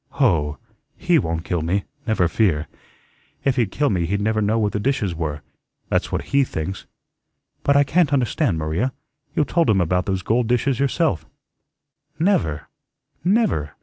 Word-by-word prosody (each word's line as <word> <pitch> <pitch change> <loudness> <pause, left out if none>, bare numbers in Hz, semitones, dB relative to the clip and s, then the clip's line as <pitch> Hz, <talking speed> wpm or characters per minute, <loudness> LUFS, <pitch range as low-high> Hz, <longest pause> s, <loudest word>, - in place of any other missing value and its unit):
"Hoh! 80 - +1 0.4
HE - - +3
won't 80 0 -2
kill 85 -3 -1
me, 90 +5 0 0.2
never 110 -6 +2
fear. 85 -4 +1 0.8
If 135 -2 +3
he'd 120 -6 +1
kill 145 +6 0
me 85 -4 0
he'd 100 +3 0
never 110 +1 +1
know 105 +2 +1
where 105 -2 +1
the 105 - -2
dishes 105 -6 0
were; 75 -3 -4 0.5
that's - - 0
what - - -1
HE 140 0 +5
thinks." 80 - -5 0.7
"But 140 0 +3
I 145 - +6
can't 155 +1 +2
understand, 130 - +1
Maria; 80 +12 -1 0.4
you 150 - +2
told 170 +3 +1
him 100 -3 +4
about 90 +1 +1
those 95 -2 -1
gold 115 +1 +1
dishes 125 +1 +1
yourself." 140 - 0 0.9
"Never, 125 - +1 0.6
never! 180 - +1
105 Hz, 160 wpm, -22 LUFS, 85-135 Hz, 0.9 s, I